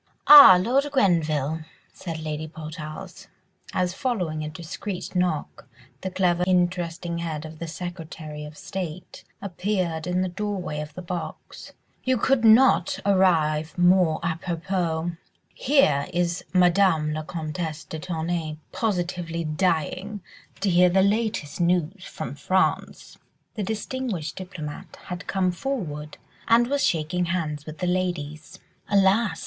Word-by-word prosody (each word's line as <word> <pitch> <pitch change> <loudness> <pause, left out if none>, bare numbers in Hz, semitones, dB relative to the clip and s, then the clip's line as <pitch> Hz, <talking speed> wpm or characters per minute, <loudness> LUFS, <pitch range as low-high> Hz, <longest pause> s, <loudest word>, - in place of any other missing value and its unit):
"Ah, 285 -11 +11
Lord 260 +9 +1
Grenville," 160 - +1 0.3
said 165 -3 -6
Lady 155 0 -4
Portarles, 160 +3 -8 0.4
as 180 -1 0
following 180 - -2
a 150 - -4
discreet 170 +5 -6
knock, 180 -4 -1 0.3
the 190 - -3
clever, 180 -1 +1
interesting 175 -1 0
head 160 -2 -4
of 155 0 -10
the 170 - -5
Secretary 160 -3 -7
of 150 0 -10
State 180 -2 -6 0.2
appeared 180 -4 -2
in 180 +1 +1
the - - -1
doorway 185 -4 -3
of 150 0 -7
the 180 - -7
box, 175 0 -7 0.3
"you 260 0 +2
could 265 +1 +2
not 225 -4 +5
arrive 165 -5 +2
more 175 -2 +4
à 165 0 -2
propos. 175 -1 -2 0.4
Here 245 - +3
is 175 0 -1
Madame 180 -4 +3
la 155 - -3
Comtesse 155 0 -5
de 160 - -7
Tournay 165 -2 -3
positively 175 -5 -2
dying 180 +5 -1 0.4
to 195 -1 +2
hear 180 +1 +5
the 190 +2 +3
latest 200 -7 -1
news 180 +2 +1
from 125 - -6
France." 185 +6 -1 0.3
The 215 - -4
distinguished 215 -5 -3
diplomatist 175 -6 -7
had 180 +1 -6
come 185 -2 +1
forward 175 - -4 0.3
and 230 +1 +5
was 285 0 +1
shaking 170 +2 0
hands 155 -4 -3
with 155 0 -7
the 180 - -2
ladies. 175 -2 -3 0.3
"Alas!" 200 +2 +3
175 Hz, 130 wpm, -25 LUFS, 155-190 Hz, 0.4 s, Ah